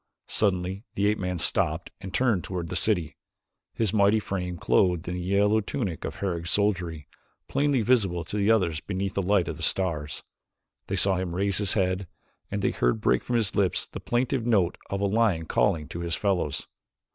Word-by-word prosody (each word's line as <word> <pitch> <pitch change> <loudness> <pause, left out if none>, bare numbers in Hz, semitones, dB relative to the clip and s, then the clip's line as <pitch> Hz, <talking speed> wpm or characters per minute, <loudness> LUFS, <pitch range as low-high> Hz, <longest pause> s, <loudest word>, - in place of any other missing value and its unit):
Suddenly 95 -1 0
the 100 - +1
ape 105 +1 +2
man 90 -1 -2
stopped 85 0 +1
and 95 -1 -7
turned 110 -4 +1
toward 90 -3 -4
the 90 - -4
city, 90 -4 +2 0.6
his 110 -4 0
mighty 105 +1 +4
frame, 90 -4 -4
clothed 90 -1 +2
in 90 - -2
the 90 - -4
yellow 100 +4 +2
tunic 100 - -4
of - - -5
Herog's 85 -3 -3
soldiery, 90 -7 0 0.4
plainly 140 -4 +1
visible 100 -8 +2
to 85 - -7
the 105 0 +1
others 90 -9 +2
beneath 95 0 -3
the 100 - 0
light 95 -2 +2
of - - -4
the - - -10
stars. 80 -6 -2 0.6
They - - -2
saw 95 -1 +3
him 90 -2 -3
raise 100 +1 +1
his 100 -1 +2
head 95 -1 0 0.4
and - - -3
they - - +2
heard - - +1
break - - +2
from 120 - -2
his 110 -5 +1
lips 95 -3 +2
the - - -8
plaintive 125 +1 0
note 100 -7 +2
of 100 0 -2
a - - +2
lion 100 -5 +1
calling 75 -1 +1
to 85 - -6
his 85 -1 -2
fellows. 95 -8 -1
95 Hz, 190 wpm, -26 LUFS, 90-105 Hz, 0.6 s, mighty